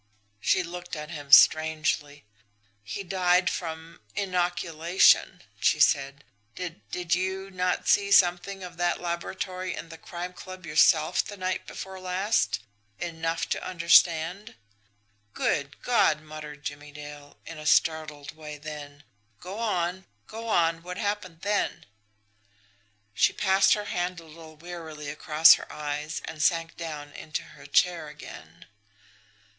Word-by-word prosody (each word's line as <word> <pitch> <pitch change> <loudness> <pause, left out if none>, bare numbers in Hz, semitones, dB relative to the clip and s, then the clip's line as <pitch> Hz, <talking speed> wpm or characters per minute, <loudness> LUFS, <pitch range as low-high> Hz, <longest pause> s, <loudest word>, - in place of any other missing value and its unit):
She 185 - +2
looked 175 0 -7
at 150 +1 -7
him 145 -4 -8
strangely. 155 -2 +5 0.6
"He 105 - -5
died 180 -1 +2
from 165 -1 -6 0.2
inoculation," 175 -2 +2 0.2
she - - +2
said. 140 0 +2 0.3
"Did 170 -8 -6
did 180 -1 -2
you 190 +1 -2
not 180 -1 -1
see 200 0 +4
something 185 +1 +3
of 180 -2 -9
that 175 0 0
laboratory 185 +2 -4
in 165 - -8
the 165 -1 -11
Crime 175 +2 -7
Club 185 0 -10
yourself 155 0 +4
the 205 - -9
night 185 0 -3
before 190 -1 -8
last 185 +4 0 0.4
enough 165 -1 -3
to - - -2
understand?" 170 +1 +3 0.8
"Good 140 0 -1
God!" 235 -10 +3
muttered 150 -1 -10
Jimmie 145 0 -7
Dale, 145 -1 -11
in 165 -2 -8
a 150 - -5
startled 155 -3 +1
way 150 -1 -8
then: 145 -1 -9 0.4
"Go 190 +4 -7
on! 185 -4 -1 0.2
Go 225 +1 -8
on! 165 -5 +2
What 180 +2 -7
happened 200 -6 -3
then?" 205 +1 -1 1.3
She - - +3
passed 195 0 +4
her 210 -1 -5
hand 180 -2 -2
a - - -13
little 160 0 -13
wearily 160 -3 -8
across 155 +2 +6
her - - -4
eyes 150 +1 -4
and 155 -1 -7
sank 165 +1 +1
down 150 -3 -7
into 155 - -5
her - - -14
chair 175 -3 +2
again. 85 - -12
170 Hz, 135 wpm, -27 LUFS, 150-185 Hz, 1.3 s, across